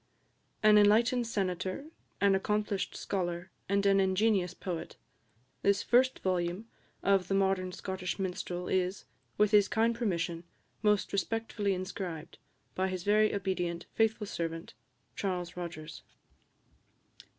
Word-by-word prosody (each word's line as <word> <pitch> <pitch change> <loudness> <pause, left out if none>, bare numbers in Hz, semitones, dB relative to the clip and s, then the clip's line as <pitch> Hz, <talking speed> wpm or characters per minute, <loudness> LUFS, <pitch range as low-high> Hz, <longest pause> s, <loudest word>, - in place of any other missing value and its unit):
AN 210 0 +7
ENLIGHTENED 230 +4 +4
SENATOR, 185 +2 -2 0.4
AN 200 -1 +5
ACCOMPLISHED 205 0 -1
SCHOLAR, 175 -1 -3 0.2
AND 200 0 +2
AN 195 0 +5
INGENIOUS 190 -1 +2
POET, 175 -3 -5 0.7
THIS 200 0 +2
FIRST 255 +2 +3
VOLUME 180 +2 -1 0.4
OF 195 -2 +3
The 195 - 0
Modern 190 -1 +1
Scottish 185 -1 -4
Minstrel 180 -1 -3
IS, 185 +1 0 0.3
WITH 210 0 +4
HIS 205 -2 +6
KIND 225 +1 +2
PERMISSION, 175 -7 -2 0.4
MOST 210 -2 +2
RESPECTFULLY 205 -1 -1
INSCRIBED, 180 -3 -6 0.3
BY 190 +1 0
HIS 185 -2 -4
VERY 215 +2 +4
OBEDIENT, 180 -3 -2
FAITHFUL 225 -1 +1
SERVANT, 165 - -4 0.4
CHARLES 180 -3 -3
ROGERS. 165 -3 -7
195 Hz, 115 wpm, -31 LUFS, 180-210 Hz, 0.7 s, AN